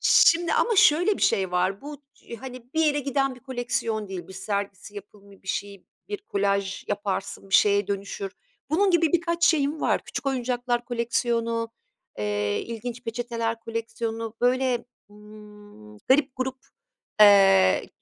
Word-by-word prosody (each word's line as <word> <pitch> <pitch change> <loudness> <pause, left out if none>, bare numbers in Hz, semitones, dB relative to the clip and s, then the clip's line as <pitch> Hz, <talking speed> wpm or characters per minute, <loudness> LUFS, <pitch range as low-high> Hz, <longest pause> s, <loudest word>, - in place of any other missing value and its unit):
şimdi 335 +1 +5
ama 465 -3 +2
şöyle 355 +4 +5
bir - - -5
şey 190 -2 +2
var, 185 +2 0
bu 290 0 -9 0.4
hani 255 -1 -10
bir 320 - +2
yere 290 -1 +2
giden 275 -1 0
bir 250 - -16
koleksiyon 245 -5 -3
değil, 185 -2 -7
bir - - -10
sergisi, 200 0 -4
yapımı, 200 -1 -13
bir 190 - -14
şey, 200 -2 -4 0.2
bir 415 -1 -4
kolaj 200 - -1
yaparsın, 200 -1 -3
bir - - 0
şeye 200 -1 +4
dönüşür. 200 -1 -4 0.4
Bunun 385 +5 +3
gibi 335 -2 +3
birkaç 340 0 +1
şeyim 300 -2 +2
var, - - +1
küçük - - -6
oyuncaklar 245 -2 -1
koleksiyonu, 230 -1 -1 0.5
eee, 105 -1 -1
ilginç 235 +1 -6
peçeteler 230 -1 -3
koleksiyonu. 230 0 -4
Böyle, 250 -1 +1 0.3
ımm, 210 - -15
garip 265 - +2
gurup, 260 0 -3 0.6
eee, 195 - +6
230 Hz, 140 wpm, -25 LUFS, 200-265 Hz, 0.6 s, eee